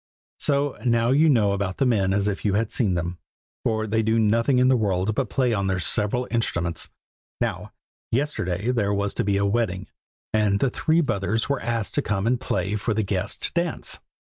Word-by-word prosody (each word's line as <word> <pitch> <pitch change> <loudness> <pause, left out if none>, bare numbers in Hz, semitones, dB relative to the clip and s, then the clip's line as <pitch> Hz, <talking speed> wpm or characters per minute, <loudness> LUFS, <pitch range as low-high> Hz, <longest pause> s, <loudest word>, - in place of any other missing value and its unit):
So, 140 -1 +1
now 115 -1 +2
you 155 +4 +4
know 110 -8 +3
about 100 -1 -2
the 135 - +2
men 100 -6 +2
as 100 +1 +1
if 100 -1 -2
you 100 -2 +1
had 110 +1 0
seen 100 -7 +1
them, 85 0 -3 0.4
for 110 -1 0
they 110 +1 +1
do 110 +1 +1
nothing 115 +4 +2
in 125 0 +4
the 130 - +5
world 100 -2 0
but - - -1
play 125 -3 +1
on 100 -2 0
their 95 -1 0
several 105 +8 +1
instruments. 85 -8 -1 0.5
Now, - - -3 0.4
yesterday 115 - -1
there 105 -5 0
was 100 0 -1
to - - -1
be 100 -1 +1
a 100 - +1
wedding, 100 -3 -1 0.5
and 105 -2 +2
the 130 - +1
three 160 +5 +2
brothers 110 - 0
were 140 - 0
asked 115 -2 -2
to 145 - +1
come 100 -6 -1
and 125 +1 +1
play 95 +2 -1
for 105 +1 -1
the 110 - +1
guests 100 0 -2
to - - -30
dance. 170 -1 -2
110 Hz, 205 wpm, -24 LUFS, 100-125 Hz, 0.5 s, the